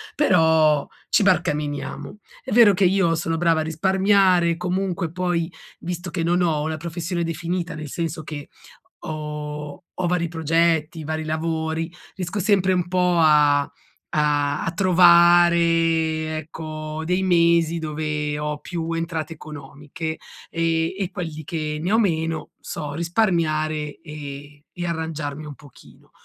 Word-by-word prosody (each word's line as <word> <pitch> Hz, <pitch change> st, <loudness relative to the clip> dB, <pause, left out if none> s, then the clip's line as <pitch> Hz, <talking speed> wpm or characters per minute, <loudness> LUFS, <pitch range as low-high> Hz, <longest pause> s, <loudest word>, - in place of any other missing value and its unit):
però 160 Hz, -, +4 dB, 0.2 s
ci -, -, +3 dB
barcameniamo. 150 Hz, -1 st, -1 dB, 0.3 s
È -, -, -7 dB
vero 225 Hz, -4 st, +7 dB
che 190 Hz, +1 st, +2 dB
io 180 Hz, -3 st, +3 dB
sono 165 Hz, 0 st, -2 dB
brava 165 Hz, -1 st, +2 dB
a -, -, -1 dB
risparmiare, 185 Hz, +1 st, +3 dB
comunque 180 Hz, -1 st, -2 dB
poi 175 Hz, -2 st, -1 dB, 0.3 s
visto 175 Hz, +1 st, -5 dB
che 175 Hz, -3 st, -2 dB
non 175 Hz, +2 st, +2 dB
ho 160 Hz, -4 st, +1 dB
una 155 Hz, 0 st, -2 dB
professione 170 Hz, +2 st, -3 dB
definita, 170 Hz, +2 st, -3 dB
nel 150 Hz, -2 st, -7 dB
senso 165 Hz, -1 st, -3 dB
che 145 Hz, -1 st, -7 dB, 0.5 s
ho 150 Hz, 0 st, -6 dB, 0.2 s
ho 180 Hz, -, +1 dB
vari 175 Hz, -1 st, 0 dB
progetti, 160 Hz, 0 st, +1 dB
vari 155 Hz, +1 st, -3 dB
lavori, 160 Hz, +1 st, -2 dB, 0.2 s
riesco 185 Hz, +2 st, -4 dB
sempre 190 Hz, -2 st, +3 dB
un 180 Hz, -1 st, 0 dB
po' 180 Hz, -1 st, +2 dB
a 150 Hz, -2 st, +5 dB, 0.5 s
a 145 Hz, -1 st, +1 dB
a 165 Hz, -, -1 dB
trovare 170 Hz, -3 st, +4 dB
ecco 155 Hz, 0 st, -6 dB
dei 180 Hz, +2 st, 0 dB
mesi 170 Hz, -2 st, +3 dB
dove 150 Hz, -1 st, -3 dB
ho 150 Hz, 0 st, -3 dB
più 165 Hz, -2 st, -4 dB
entrate 165 Hz, -1 st, -3 dB
economiche, 150 Hz, +1 st, -7 dB, 0.3 s
ehm, 165 Hz, 0 st, 0 dB
e 195 Hz, -2 st, -2 dB
quelli 160 Hz, -4 st, -5 dB
che 155 Hz, -1 st, -3 dB
ne 180 Hz, -, -1 dB
ho 220 Hz, -, +4 dB
meno, 165 Hz, -5 st, -1 dB
so 145 Hz, -2 st, -6 dB
risparmiare 155 Hz, -4 st, 0 dB
e 145 Hz, -2 st, -9 dB
e 175 Hz, -1 st, -5 dB
arrangiarmi 160 Hz, -3 st, -4 dB
un 145 Hz, -2 st, -8 dB
pochino. 145 Hz, -4 st, -18 dB
165 Hz, 135 wpm, -23 LUFS, 155-175 Hz, 0.5 s, vero